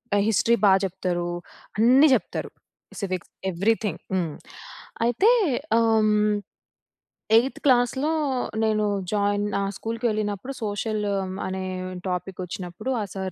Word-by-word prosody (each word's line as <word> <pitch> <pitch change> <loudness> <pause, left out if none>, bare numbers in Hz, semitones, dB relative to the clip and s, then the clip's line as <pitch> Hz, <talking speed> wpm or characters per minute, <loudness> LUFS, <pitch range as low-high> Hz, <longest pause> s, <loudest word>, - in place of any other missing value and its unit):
ఆహ్, 200 - +3
హిస్టరీ 230 +3 +3
బా 195 - +7
చెప్తరూ. 175 -2 -2 0.5
అన్ని 260 +6 +6
చెప్తరు. - - -4 0.5
Civics 185 -2 -4 0.2
everything. 210 +4 0
హ్మ్. 170 -4 0 0.7
అయితే 380 - +4 0.5
ఆహ్, 230 0 +3 0.2
హ్మ్. 210 0 +3 1.0
ఎయిత్ 250 +4 +3
క్లాస్‌లో, 260 +3 +3 0.5
నేను 215 -1 +2 0.3
జోయిన్ 205 0 +1
ఆహ్, 195 0 -1
స్కూల్‌కెళ్ళినప్పుడు, 220 0 -2
సోషలు 210 0 -2
ఆహ్, 185 -1 -4
అనే 190 0 -3 0.4
టోపికొచ్చినప్పుడు, 180 +3 -5
ఆ - - -1
సార్ 190 -1 -4
205 Hz, 110 wpm, -25 LUFS, 190-230 Hz, 1.0 s, బా